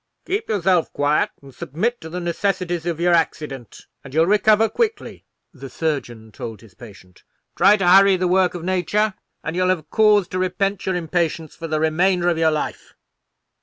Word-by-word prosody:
"Keep 400 Hz, +5 st, -3 dB
yourself 185 Hz, -5 st, +1 dB
quiet, 145 Hz, +1 st, +1 dB
and 135 Hz, -1 st, -14 dB
submit 170 Hz, -, -3 dB
to 160 Hz, -, -8 dB
the 180 Hz, +2 st, -5 dB
necessities 175 Hz, -1 st, -2 dB
of 165 Hz, -2 st, -2 dB
your 175 Hz, 0 st, +2 dB
accident, 150 Hz, -7 st, -2 dB, 0.2 s
and 135 Hz, 0 st, -11 dB
you'll 160 Hz, +1 st, +4 dB
recover 210 Hz, +3 st, +3 dB
quickly," 450 Hz, -, -3 dB, 0.3 s
the 135 Hz, -2 st, -10 dB
surgeon 120 Hz, -8 st, -4 dB
told 110 Hz, 0 st, -8 dB
his 110 Hz, -4 st, -18 dB
patient. 95 Hz, -5 st, -15 dB, 0.3 s
"Try 200 Hz, +4 st, +5 dB
to 195 Hz, -3 st, -1 dB
hurry 195 Hz, +2 st, +6 dB
the 180 Hz, 0 st, 0 dB
work 180 Hz, 0 st, +2 dB
of 170 Hz, -, -6 dB
nature, 185 Hz, +4 st, 0 dB, 0.3 s
and 160 Hz, -, -4 dB
you'll 185 Hz, 0 st, +1 dB
have 160 Hz, -5 st, -2 dB
cause 210 Hz, -3 st, +4 dB
to 185 Hz, -, -3 dB
repent 195 Hz, +2 st, -2 dB
your 190 Hz, -, 0 dB
impatience 165 Hz, -2 st, -2 dB
for 165 Hz, -, -7 dB
the 155 Hz, -1 st, -1 dB
remainder 175 Hz, +3 st, +2 dB
of 170 Hz, -2 st, -1 dB
your 160 Hz, -1 st, +4 dB
life." 155 Hz, -1 st, -4 dB
175 Hz, 180 wpm, -21 LUFS, 155-190 Hz, 0.3 s, hurry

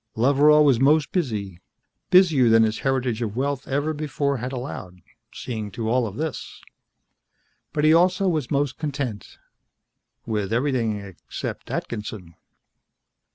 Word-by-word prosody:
Loveral 145 Hz, +5 st, +5 dB
was 135 Hz, -5 st, +4 dB
most 145 Hz, +2 st, +3 dB
busy, 105 Hz, -, -3 dB, 0.5 s
busier 165 Hz, -10 st, +5 dB
than 115 Hz, 0 st, +6 dB
his 110 Hz, 0 st, 0 dB
heritage 125 Hz, -4 st, -1 dB
of 110 Hz, -3 st, -3 dB
wealth 135 Hz, +1 st, -2 dB
ever 145 Hz, +3 st, -1 dB
before 145 Hz, -2 st, -2 dB
had 125 Hz, +2 st, -5 dB
allowed, 110 Hz, -9 st, -7 dB, 0.3 s
seeing 110 Hz, -4 st, -5 dB
to 115 Hz, -2 st, -4 dB
all 120 Hz, +1 st, +1 dB
of 100 Hz, -, -8 dB
this. 160 Hz, 0 st, -5 dB, 1.1 s
But 150 Hz, 0 st, -1 dB
he 155 Hz, +1 st, +6 dB
also 180 Hz, +3 st, +3 dB
was 155 Hz, -8 st, -1 dB
most 140 Hz, -1 st, -1 dB
content 140 Hz, -8 st, -4 dB, 0.9 s
with 105 Hz, -3 st, -2 dB
everything 120 Hz, -4 st, 0 dB
except 95 Hz, -5 st, -7 dB
Atkinson. 105 Hz, -6 st, -5 dB
130 Hz, 130 wpm, -23 LUFS, 110-150 Hz, 1.1 s, than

